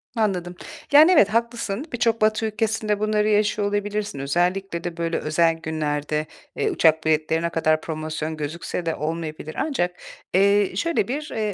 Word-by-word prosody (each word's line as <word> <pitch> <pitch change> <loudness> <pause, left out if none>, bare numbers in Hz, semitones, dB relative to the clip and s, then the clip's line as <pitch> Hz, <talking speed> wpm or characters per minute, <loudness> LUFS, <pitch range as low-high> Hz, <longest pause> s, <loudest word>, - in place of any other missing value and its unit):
Anladım. 180 -5 -1 0.4
Yani, 305 +5 +8
evet, 290 - +6
haklısın. 230 +1 -1
Birçok 230 -1 +1
Batı 215 +1 +2
ülkesinde 215 -1 -1
bunları 215 0 +1
yaşıyor 210 0 +2
olabilirsin. 205 -4 -2
Özellikle 175 +5 -1
de 175 -1 -5
böyle 170 0 -1
özel 165 +2 +2
günlerde, 155 -1 -2 0.3
eee, 435 - 0
uçak 160 - +3
biletleri 155 +1 +1
ne 170 - 0
kadar 155 -1 +1
promosyon 155 0 -4
gözükse 165 +3 -4
de 165 - -1
olmayabilir 155 0 -5
ancak, 180 - -1 0.3
eee, 200 +1 +4
şöyle 335 - 0
bir, 295 +5 -4
eee, 215 -2 -2
180 Hz, 150 wpm, -23 LUFS, 160-215 Hz, 0.4 s, Yani